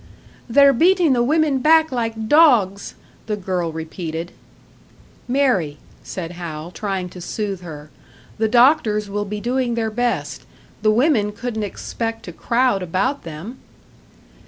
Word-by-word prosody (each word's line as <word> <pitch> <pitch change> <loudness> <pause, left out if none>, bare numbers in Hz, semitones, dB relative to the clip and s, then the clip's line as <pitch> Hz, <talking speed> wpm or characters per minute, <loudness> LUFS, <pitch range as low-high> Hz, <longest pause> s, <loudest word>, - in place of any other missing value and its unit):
"They're 280 +3 +6
beatin' 345 +2 +4
the 240 - +2
women 295 +1 +2
back 315 +3 +4
like 225 -3 -3
dogs!" 230 - +4 0.3
the 215 - -1
girl 180 -4 -2
repeated. 160 +1 -5 1.0
"Mary," 240 - +1 0.2
said 170 -3 -6
Hal, 170 -2 -7
trying 190 -1 -3
to 180 - -11
soothe 200 +1 -4
her, 155 -3 -10 0.5
"the 220 - +2
doctors 235 -4 +3
will 205 +1 -2
be 210 +1 -5
doing 245 +1 -1
their 225 -1 -1
best. 245 +2 -2 0.4
The 215 - +3
women 220 -2 +2
couldn't 220 +1 -4
expect 225 +2 -4
to 175 - -7
crowd 235 +1 +1
about 190 - -1
them!" 170 +11 -8
220 Hz, 135 wpm, -20 LUFS, 185-255 Hz, 1.0 s, They're